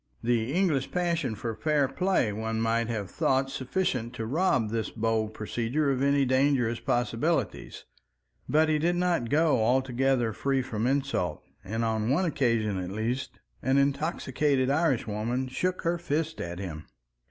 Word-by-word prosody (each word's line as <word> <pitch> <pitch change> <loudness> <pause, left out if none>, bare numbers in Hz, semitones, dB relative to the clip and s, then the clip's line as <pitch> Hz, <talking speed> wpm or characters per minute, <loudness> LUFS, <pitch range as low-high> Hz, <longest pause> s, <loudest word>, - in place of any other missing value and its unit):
The 120 0 +1
English 160 -6 +1
passion 170 -9 -1
for 115 +2 -4
fair 150 +3 +1
play 180 - +1
one 110 +1 -2
might 115 0 +1
have 105 -6 -3
thought 135 0 +1
sufficient 130 -4 -2
to 115 - -4
rob 125 - +1
this 110 -2 -1
bold 110 -1 -1
procedure 120 +7 -1
of 130 -1 -1
any 140 0 +3
dangerous 130 -3 +2
possibilities, 120 +7 -1 0.6
but 155 +1 +4
he 155 -1 +2
did 170 +3 +1
not 175 -9 0
go 155 -5 +3
altogether 130 -1 +1
free 135 +3 0
from 115 -2 -2
insult, 140 +1 -1 0.2
and 115 +4 -2
on 110 0 0
one 165 +8 +2
occasion 115 - +1
at 90 -1 -4
least 115 +6 -3 0.2
an 130 +1 +2
intoxicated 140 -1 +1
Irish 145 -4 +2
woman 115 +5 -2
shook 180 +8 -2
her 170 +1 0
fist 160 0 -2
at 85 0 -5
him. 85 -5 -6
130 Hz, 155 wpm, -28 LUFS, 115-150 Hz, 0.6 s, but